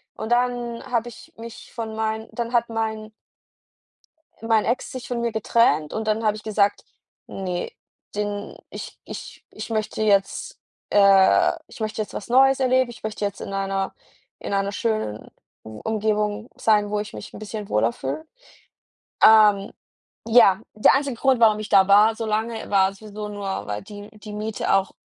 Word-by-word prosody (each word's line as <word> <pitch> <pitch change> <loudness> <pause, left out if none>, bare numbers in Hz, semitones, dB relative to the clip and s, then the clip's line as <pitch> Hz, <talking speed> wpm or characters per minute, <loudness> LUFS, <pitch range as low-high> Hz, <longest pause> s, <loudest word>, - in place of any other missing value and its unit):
und 220 - -6
dann 240 -1 0
habe 240 0 0
ich 230 - -14
mich 230 0 -10
von 220 -2 -5
meinen 220 0 -2
dann 235 -1 -3
hat 235 -1 +2
mein 220 -1 -3 1.3
mein 225 -1 +2
Ex 240 +3 -1
sich 255 -1 -7
von 240 -1 -2
mir 235 -1 -1
getrennt 215 -8 +2
und 220 0 -3
dann 215 +1 0
habe 215 0 +2
ich 215 - -10
gesagt: 205 -2 +1 0.4
„Ne, 180 -2 -4 0.4
den 205 0 -4
ich - - -8
ich - - -9
ich - - -8
möchte 215 -1 -2
jetzt 205 - 0 0.3
äh, 200 - +5 0.2
ich - - -14
möchte 215 0 -2
jetzt 210 - -6
was - - -6
Neues 270 +2 +5
erleben, 255 -1 +2
ich 235 - -12
möchte 215 -1 -4
jetzt 200 -1 -4
in 195 - -6
einer 195 0 -2 0.5
in - - -5
einer 195 0 0
schönen 215 - -2 0.3
Um 110 -1 -10
Umgebung 215 +1 -1
sein, 210 -2 +2
wo 210 0 -1
ich 210 0 -6
mich - - -9
'n - - -9
bisschen 215 -1 -7
wohler 110 +2 +2
fühle.“ 135 - -5 1.0
Ähm, 210 -2 +6 0.6
ja, 220 -4 +6
der 215 - +5
einzige 275 -2 -1
Grund, 265 -2 +2
warum 215 -2 +5
ich 215 - -6
da 190 -1 +5
war, 210 +3 +6
so 225 - -4
lange, 220 +1 -2
war 195 -1 +3
sowieso 210 0 -8
nur, 200 -2 -4
weil 105 0 -4
die 205 0 -10
die 210 0 -10
Miete 215 +1 -2
auch 195 0 +1
215 Hz, 170 wpm, -23 LUFS, 200-230 Hz, 1.3 s, Ähm